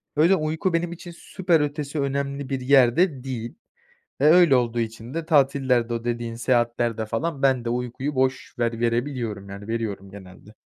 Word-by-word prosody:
Öyle 170 +6 +5
uyku 160 +3 -1
benim 170 0 0
için 175 0 -9
süper 175 -4 0
ötesi 145 0 -3
önemli 140 0 -2
bir 135 -2 -2
yerde 135 +3 +3
değil. 120 -3 -5 0.7
E, - - +2
öyle 160 -3 +6
olduğu 120 -1 0
için 115 +3 -6
de 165 -1 -3
tatillerde, 135 -6 +2
o 115 0 -4
dediğin 120 -1 -3
seyahatlerde 120 -2 0
falan 140 +6 -3
ben 130 -3 +2
de 115 - -2
uykuyu 125 +4 -3
boş 130 0 -1
ver 115 -1 -1
verebiliyorum 115 -4 -2
yani 100 +2 -9
veriyorum 105 -4 -4
genelde. 100 +2 -13
130 Hz, 165 wpm, -24 LUFS, 115-145 Hz, 0.7 s, öyle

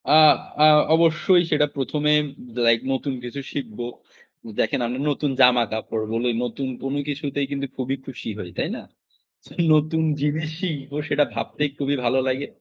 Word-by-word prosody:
আ - - +4 0.5
আ - - +9 0.3
অবশ্যই 170 +2 +4
সেটা 150 -1 +3
১ম 140 +2 -2
এ - - +6 0.5
লাইক 115 0 +5
নতুন 135 +1 -2
কিছু 125 +3 -6
শিখব। 120 -7 -5 0.8
দেখেন 110 - +1
আমি 125 +2 -3
নতুন 145 0 -1
জামা 125 -1 +6
কাপড় 110 0 -3
বলি 120 +2 0
নতুন 130 +3 -3 0.2
কোনো 135 +1 -2
কিছুতেই 145 -1 -2
কিন্তু 140 0 -2
খুবই 130 +1 -2
খুশি 130 -3 -7
হই। 90 - -6
তাই - - -1
না? - - -7 0.9
নতুন 155 +1 +2 0.2
জিনিস 150 +2 0
শিখবো 145 -5 -4
সেটা 145 0 +3
ভাবতেই 150 -1 -2
খুবই 140 0 0
ভালো 120 +2 +2
লাগে। 130 +2 -1
140 Hz, 155 wpm, -23 LUFS, 125-150 Hz, 0.9 s, আ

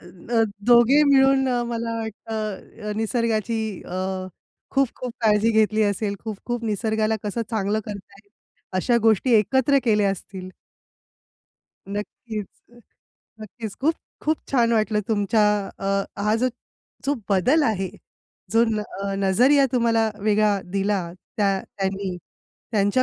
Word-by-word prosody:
अ, 190 +6 -2 0.2
दोघे 245 +5 +6
मिळून, 270 -1 +4
अ, 245 -1 +1
मला 230 -1 -3
वाटतं 215 -1 -5
निसर्गाची 225 0 0 0.3
अ, 180 +1 -4 0.7
खूप 270 -2 +2
खूप 250 -2 -5
काळजी 215 0 +3
घेतली 220 0 +3
असेल, 205 0 0
खूप 220 -2 -4
खूप 240 -1 -2
निसर्गाला 220 0 0
कसं 210 +3 -2
चांगलं 215 -1 0
करता 200 -2 -8
येईल, 200 - -36 0.5
अशा 235 +6 +2
गोष्टी 225 +3 +3
एकत्र 265 +6 +3
केल्या 210 -3 +3
असतील. 185 -1 -7 1.4
नक्कीच, 210 +1 -5 0.3
अ, 240 - -17 0.6
नक्कीच. 215 0 -7
खूप 315 +4 +2 0.3
खूप 310 +1 +1
छान 235 -3 +2
वाटलं 215 -1 +2
तुमच्या 210 0 +2 0.4
अ, 195 - -4 0.4
हा 210 +1 +3
जो 255 +3 +1 0.6
जो 285 - +1 0.2
बदल 250 - +3
आहे, 195 -6 0 0.6
जो 225 +3 +4
न 215 -1 -1 0.4
नजरिया 265 +8 +5
तुम्हाला 230 -2 +2
वेगळा 210 -1 +2
दिला 200 +1 +1 0.4
त्या 195 -2 +2
त्यांनी 195 -1 -3 0.6
त्यांच्या 205 +4 +3
220 Hz, 125 wpm, -23 LUFS, 205-240 Hz, 1.4 s, दोघे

